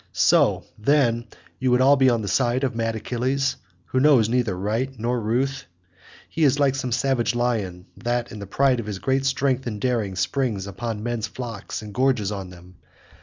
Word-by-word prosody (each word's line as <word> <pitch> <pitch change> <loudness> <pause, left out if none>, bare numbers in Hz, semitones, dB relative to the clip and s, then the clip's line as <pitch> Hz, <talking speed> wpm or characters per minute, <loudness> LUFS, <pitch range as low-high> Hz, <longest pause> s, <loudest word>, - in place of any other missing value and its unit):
So, - - +3 0.2
then, 120 -2 +2 0.3
you 130 - +1
would 125 0 +4
all 135 +2 +6
be 135 -2 +4
on 115 -3 +1
the - - -4
side 120 +6 +1
of 130 -2 0
mad 115 -1 -1
Achilles, 130 +4 -1 0.3
who 130 - -1
knows 130 -6 +5
neither 120 -6 0
right 110 +7 -1
nor 120 +2 -1
ruth? 130 +5 -1 0.6
He 165 - -2
is 140 -1 +4
like 140 -2 +3
some 135 -2 -3
savage 120 -1 +1
lion 105 -7 -1
that 120 0 -2
in 105 - -8
the 100 - -7
pride 130 +4 +2
of 110 - -5
his 105 -2 -4
great 135 +5 0
strength 135 -1 0
and 105 -3 -4
daring 110 -5 -1
springs 105 0 -1
upon 105 +2 -5
men's 120 -2 -2
flocks 115 -3 -6
and 105 -1 -9
gorges 125 -5 +1
on 95 -3 -5
them. 90 0 -15
120 Hz, 190 wpm, -23 LUFS, 105-130 Hz, 0.6 s, all